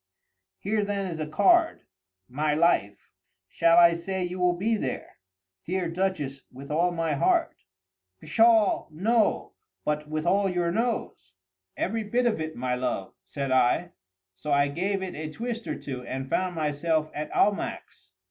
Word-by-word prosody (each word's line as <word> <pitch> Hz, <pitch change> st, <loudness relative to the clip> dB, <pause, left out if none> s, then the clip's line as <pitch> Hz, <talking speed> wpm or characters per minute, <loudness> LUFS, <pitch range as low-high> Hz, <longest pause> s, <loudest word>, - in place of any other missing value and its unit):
"Here 210 Hz, +1 st, -1 dB
then 200 Hz, -1 st, -2 dB
is 170 Hz, -4 st, -5 dB
a 155 Hz, -, -3 dB
card, 335 Hz, -, +3 dB, 0.5 s
my 150 Hz, +3 st, 0 dB
life. 150 Hz, -, +1 dB, 0.4 s
Shall 165 Hz, 0 st, +3 dB
I 170 Hz, -1 st, +8 dB
say 185 Hz, +3 st, -3 dB
you 180 Hz, +1 st, -4 dB
will 180 Hz, -1 st, +2 dB
be 220 Hz, +5 st, +1 dB
there?" 135 Hz, -12 st, -5 dB, 0.5 s
"Dear 180 Hz, -1 st, -2 dB
Duchess, 165 Hz, -7 st, -2 dB
with 135 Hz, +3 st, -10 dB
all 170 Hz, +4 st, +2 dB
my 165 Hz, -3 st, -1 dB
heart." 335 Hz, -, +1 dB, 0.6 s
"Pshaw, 225 Hz, +5 st, +3 dB
no!—but 155 Hz, -5 st, -1 dB
with 155 Hz, +1 st, -3 dB
all 195 Hz, +2 st, +2 dB
your 175 Hz, -2 st, 0 dB
nose?" 225 Hz, -, -3 dB, 0.4 s
"Every 220 Hz, +4 st, -1 dB
bit 240 Hz, +4 st, 0 dB
of 220 Hz, -9 st, +1 dB
it, 155 Hz, 0 st, -4 dB
my 125 Hz, 0 st, -2 dB
love," 125 Hz, -6 st, -3 dB
said 140 Hz, -2 st, -4 dB
I:—so 95 Hz, -, -1 dB
I 140 Hz, 0 st, +3 dB
gave 190 Hz, +6 st, -1 dB
it 185 Hz, -, -5 dB
a 155 Hz, 0 st, -5 dB
twist 230 Hz, +6 st, -5 dB
or -, -, -3 dB
two, 130 Hz, -3 st, -6 dB
and 135 Hz, 0 st, -4 dB
found 185 Hz, -1 st, 0 dB
myself 155 Hz, 0 st, 0 dB
at 150 Hz, +1 st, -4 dB
Almack's. 200 Hz, -, -1 dB
170 Hz, 150 wpm, -26 LUFS, 145-195 Hz, 0.6 s, I